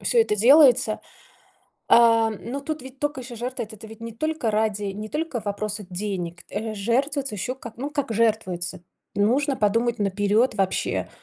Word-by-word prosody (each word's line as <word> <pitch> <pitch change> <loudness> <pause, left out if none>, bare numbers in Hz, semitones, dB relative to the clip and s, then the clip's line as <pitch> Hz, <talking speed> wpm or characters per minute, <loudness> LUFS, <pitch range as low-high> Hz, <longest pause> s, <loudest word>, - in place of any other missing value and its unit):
всё 475 - +3
это 210 - +2
делается. 250 -2 +6 0.9
А, 230 -1 +6
ну 240 +6 -5
тут 310 -1 -4
ведь 265 +1 -12
только 290 -3 -2
еще 245 -1 -9
жертвы- 245 +1 -4
это 215 0 -11
ты 220 - -11
ведь 220 0 -12
не 230 0 -6
только 305 -1 -1
ради, 210 -1 0
не 215 +2 -6
только 300 -5 -3
вопроса 210 -1 -4
денег. 180 -2 -4
Э, 215 +1 -4
жертвуется 265 +5 0
еще 245 +6 -3
как, 235 -3 -10
ну, 275 +4 -3
как 285 -5 -2
жертвуется- 190 -5 0 0.3
нужно 265 +7 +2
подумать 230 +3 +1
наперёд 205 +4 +2
вообще, 195 -2 -1
225 Hz, 165 wpm, -24 LUFS, 210-265 Hz, 0.9 s, делается